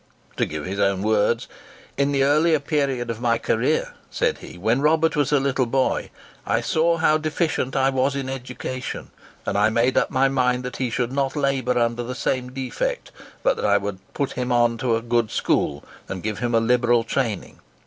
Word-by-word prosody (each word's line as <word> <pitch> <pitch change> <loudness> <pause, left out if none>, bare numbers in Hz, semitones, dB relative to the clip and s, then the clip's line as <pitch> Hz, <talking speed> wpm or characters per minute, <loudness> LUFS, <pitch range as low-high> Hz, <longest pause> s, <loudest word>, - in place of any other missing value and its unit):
To - - +1
give 75 -1 -5
his 95 +2 -4
own 100 -1 +1
words:—"In 115 +5 -1
the 135 -1 +2
earlier 155 +3 +3
period 135 -5 -1
of 115 0 -7
my 115 -2 +2
career," 115 - 0 0.2
said - - 0
he, - - -11
"when 115 +8 +1
Robert 160 +2 +3
was 145 -2 +1
a 145 - +4
little 135 -2 0
boy, 130 +2 0 0.3
I 115 +3 +1
saw 165 +7 +1
how 155 -1 +3
deficient 155 -3 -1
I 135 0 +3
was 135 +1 +1
in 135 -1 -3
education, 130 -1 -5 0.3
and - - -2
I 105 +1 +4
made 120 +3 +2
up - - -1
my 135 +1 +3
mind 125 -2 +1
that 125 -1 -5
he 130 -2 -1
should 120 +1 -1
not 135 0 -1
labour 135 -4 0
under 120 0 +1
the 125 +1 -5
same 125 -1 -1
defect, 310 - -3 0.3
but - - +2
that 460 - -2
I - - +4
would 100 -1 -4 0.2
put 140 -2 -1
him 120 -2 +1
to 120 -2 +1
a 115 - -3
good 120 -2 +1
school, 70 -6 0 0.3
and 95 -2 -5
give 105 -1 -3
him 120 0 0
a - - +5
liberal 120 0 +3
training. 115 -3 -2
125 Hz, 195 wpm, -23 LUFS, 115-140 Hz, 0.3 s, a